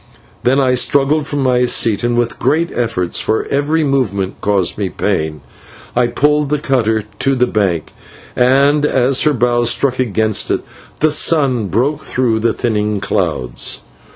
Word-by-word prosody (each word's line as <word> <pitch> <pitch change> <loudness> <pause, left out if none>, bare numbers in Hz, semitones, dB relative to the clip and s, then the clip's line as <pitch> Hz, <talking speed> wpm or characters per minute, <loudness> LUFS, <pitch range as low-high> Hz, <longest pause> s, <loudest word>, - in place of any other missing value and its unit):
Then 130 +3 +2
I 130 -2 +2
struggled 145 +3 +1
from 145 -2 -2
my 125 -1 +2
seat, 115 -3 +2
and 120 0 0
with 120 -1 -1
great 165 +3 0
efforts, 110 -8 -1
for 110 - -1
every 145 +3 +1
moment 105 -9 -1
caused 100 -4 0
me 100 -3 -3
pain, 80 -8 -2 0.5
I 120 0 +2
pulled 150 +4 +1
the 150 - +1
cutter 115 -6 0 0.2
to 135 -1 +1
the 125 -1 +2
bank, 95 -9 -1 0.4
and 140 +4 +3
as 130 -2 +2
her 150 - +3
bows 120 -1 +1
struck 130 0 0
against 110 -3 0
it, - - -1 0.4
the 155 0 +3
sun 140 -8 +2
broke 130 - 0
through 125 -6 -1
the 115 +1 +1
thinning 105 -3 -1
clouds. 65 -9 -1
125 Hz, 155 wpm, -15 LUFS, 110-140 Hz, 0.5 s, and